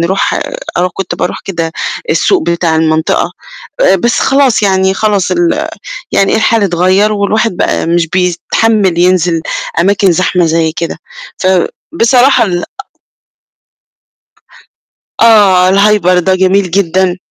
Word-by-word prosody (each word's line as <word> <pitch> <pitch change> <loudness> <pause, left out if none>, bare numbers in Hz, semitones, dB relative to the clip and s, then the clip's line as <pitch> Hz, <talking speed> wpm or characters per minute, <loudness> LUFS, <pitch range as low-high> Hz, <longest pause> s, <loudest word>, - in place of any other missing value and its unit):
نروح 185 +3 0 0.4
أنا 180 +1 +1
كنت 185 -2 -4
باروح - - -4
كده 165 -4 -4 0.4
السوق 375 -5 +1
بتاع 170 -1 -1
المنطقة، 160 0 0 0.5
آآ - - +4
بس 235 -1 0
خلاص 270 -5 +2
يعني 190 -1 +1
خلاص 205 -2 0
ال 345 -1 0 0.4
يعني 195 - +1
الحال 220 0 +1
اتغير 185 +3 +1
والواحد 210 0 -1
بقى - - -1
مش 170 -1 0
بيتحمل 185 +2 0
ينزل 175 -2 +1 0.4
أماكن 195 +1 +2
زحمة 180 0 0
زي 160 0 0
كده. 170 0 -5 1.0
فبصراحة 255 -2 +3
ال 175 -3 -3
أ - - -4 2.6
آه 200 -5 +4
الhyper 195 -2 +2
ده 185 +1 +1
جميل 190 0 +1
جدًا. 185 0 0
190 Hz, 120 wpm, -11 LUFS, 175-210 Hz, 2.6 s, آآ